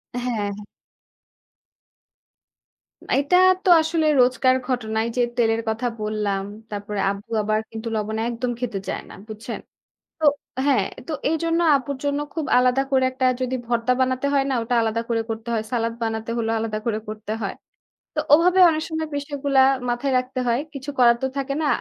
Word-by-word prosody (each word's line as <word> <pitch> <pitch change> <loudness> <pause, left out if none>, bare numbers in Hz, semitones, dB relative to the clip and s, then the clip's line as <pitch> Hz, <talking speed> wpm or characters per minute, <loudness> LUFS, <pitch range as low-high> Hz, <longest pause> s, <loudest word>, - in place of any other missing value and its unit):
হ্যাঁ, 245 - -3
হ্যাঁ। 205 -1 -1 2.6
এটা 285 +6 +3 0.3
তো - - +2
আসলে 320 0 0 0.2
রোজকার 255 +1 +3
ঘটনাই 220 -3 -1
যে, - - +3 0.2
তেলের 225 -1 +2
কথা 225 +3 -1
বললাম, 210 -2 -1 0.3
তারপরে 205 0 -4
আব্বু 200 +4 -6
আবার 215 +1 +1
কিন্তু 225 +1 -6
লবণ 215 0 -2
একদম 240 +1 -2
খেতে 235 -5 -3
চায় - - -3
না, - - -11
বুঝছেন? 220 +2 -6 0.6
তো 315 - -3 0.4
হ্যাঁ, 280 -3 +3 0.2
তো - - -4 0.2
এইজন্য 330 +2 0 0.2
আব্বুর 275 0 -4
জন্য 285 0 0
খুব 320 -3 -2
আলাদা 250 +1 +3
করে 260 -1 +3
একটা 260 0 -3 0.2
যদি 255 0 -1
ভর্তা 235 +1 +1
বানাতে 260 +1 +1
হয় 275 -1 +3
না - - +1
ওটা 230 +2 -1
আলাদা 225 0 0
করে 230 -1 0
করতে 225 +1 -5
হয়। 220 - 0
সালাদ 230 -1 0
বানাতে 225 0 -2
হলেও 225 -1 0
আলাদা 220 -1 -2
করে 220 -2 0
করতে 215 0 -5
হয়। 195 - -3 0.6
তো - - -6
ওভাবে 350 +5 +6
অনেক 315 -1 0
সময় 320 -1 -2
পুষ্টিগুলা 285 -1 0 0.3
মাথায় 245 +3 0
রাখতে 255 +1 -4
হয়। 235 +2 +2
কিছু 275 +1 -5
করার 235 -1 +6
তো - - +2
থাকে 275 0 -2
না। - - +1
245 Hz, 170 wpm, -23 LUFS, 220-275 Hz, 2.6 s, ওভাবে